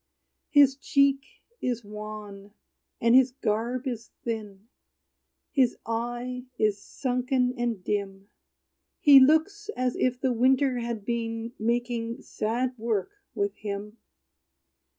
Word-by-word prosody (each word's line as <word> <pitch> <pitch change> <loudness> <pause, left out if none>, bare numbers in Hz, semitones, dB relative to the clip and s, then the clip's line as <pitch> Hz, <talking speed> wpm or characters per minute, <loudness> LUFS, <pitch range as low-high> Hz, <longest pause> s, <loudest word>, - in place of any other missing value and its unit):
His 280 -2 +6
cheek 275 -1 +2 0.3
is 240 -3 -2
wan, 210 -1 -9 0.4
and 230 0 +3
his 260 0 +6
garb 240 +2 -1
is 235 -3 -4
thin; 215 -3 -5 0.8
His 260 -5 +2
eye 240 +2 -3
is 210 -2 +1
sunken 250 +1 0
and 235 -6 -2
dim; 200 -1 -3 0.7
He 285 -2 +9
looks 320 +10 +3
as 255 -1 0
if 250 -1 0
the 260 -2 +1
winter 255 +2 +3
had 235 -3 -4
been 230 0 -3
Making 235 0 -1
sad 240 +4 -2
work 220 - -1 0.2
with 405 -1 0
him. 210 +1 -6
240 Hz, 110 wpm, -27 LUFS, 215-255 Hz, 0.8 s, He